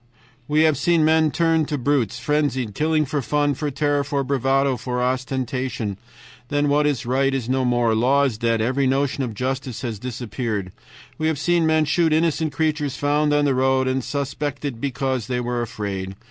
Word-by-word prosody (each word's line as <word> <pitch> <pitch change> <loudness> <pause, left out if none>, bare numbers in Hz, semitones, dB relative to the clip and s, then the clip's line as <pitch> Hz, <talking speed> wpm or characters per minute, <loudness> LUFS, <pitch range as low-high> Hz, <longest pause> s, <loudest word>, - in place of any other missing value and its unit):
"We 150 +1 +3
have 155 -4 +3
seen 165 0 +3
men 160 0 +4
turned 165 -1 +1
to 150 - -2
brutes, 125 -4 0
frenzied, 130 -6 -1
killing 155 +4 +1
for 145 +1 -2
fun, 145 +3 +1
for 150 +2 -3
terror, 145 +1 0
for 140 -1 -1
bravado, 135 0 +1
for 125 +1 -3
ostentation. 125 -4 -2 0.5
Then 145 0 +1
when 150 +1 +3
right 135 +2 +1
is 135 -4 -2
no 130 +1 +1
more, 120 -2 +2
law 130 +6 +3
is 120 -6 -1
dead, 115 -1 +1
every 130 +4 +1
notion 135 +1 0
of 115 -4 -4
justice 130 0 -3
has 115 -5 -4
disappeared. 115 -5 -4 0.5
We 155 - +1
have 160 -2 0
seen 170 +2 +2
men 155 -1 +3
shoot 160 +1 +2
innocent 160 -1 +1
creatures 150 -2 -1
found 150 +1 +1
on 145 0 +3
the 140 - +2
road, 130 0 +2
and 130 0 0
suspected 140 -2 -3
because 135 -4 -2
they 125 -1 -1
were 120 0 -2
afraid. 100 -4 -4
135 Hz, 180 wpm, -22 LUFS, 125-150 Hz, 0.5 s, men